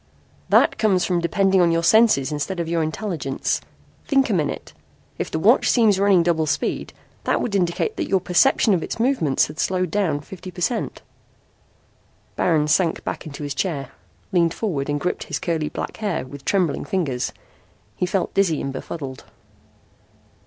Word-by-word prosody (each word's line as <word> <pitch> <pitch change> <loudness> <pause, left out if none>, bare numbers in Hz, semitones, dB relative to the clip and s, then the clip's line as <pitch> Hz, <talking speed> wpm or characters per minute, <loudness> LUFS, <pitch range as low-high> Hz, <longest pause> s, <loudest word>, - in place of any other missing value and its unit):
"That - - +4
comes 195 -5 +3
from 175 -2 0
depending 190 +2 +2
on 170 -1 +4
your 165 0 +1
senses 215 - +4
instead 150 +5 -3
of 170 - -2
your 165 0 0
intelligence. 155 -4 -2 0.5
Think 270 -4 +2
a - - +2
minute. 155 -6 -2 0.5
If - - -2
the - - -2
watch 215 +10 +4
seems 215 -5 +4
running 195 -3 +4
double 165 -2 +1
speed 140 - -2 0.3
that - - +2
would 220 - -2
indicate 195 - 0
that 335 -4 -2
your 195 - +2
perception 195 +5 +3
of 175 - +1
its - - -5
movements 230 - +2
had 150 +2 -10
slowed 185 -2 0
down 180 -8 0
fifty 185 +3 -10
per 180 - -11
cent." 235 +6 -2 1.3
Baron 155 -4 +2
sank 165 +2 +1
back - - -5
into 145 0 -7
his 145 -1 -3
chair, 140 -4 -3 0.4
leaned 170 -2 +2
forward 150 -11 -2
and 145 0 0
gripped 180 - -2
his 160 - -3
curly 155 +1 -2
black - - -5
hair 200 -11 -2
with 140 +1 -11
trembling 180 -7 +1
fingers. 140 -10 -2 0.6
He 180 - -1
felt 190 0 -1
dizzy 185 -6 +2
and 135 - -4
befuddled. 135 -1 -7
175 Hz, 170 wpm, -22 LUFS, 150-195 Hz, 1.3 s, That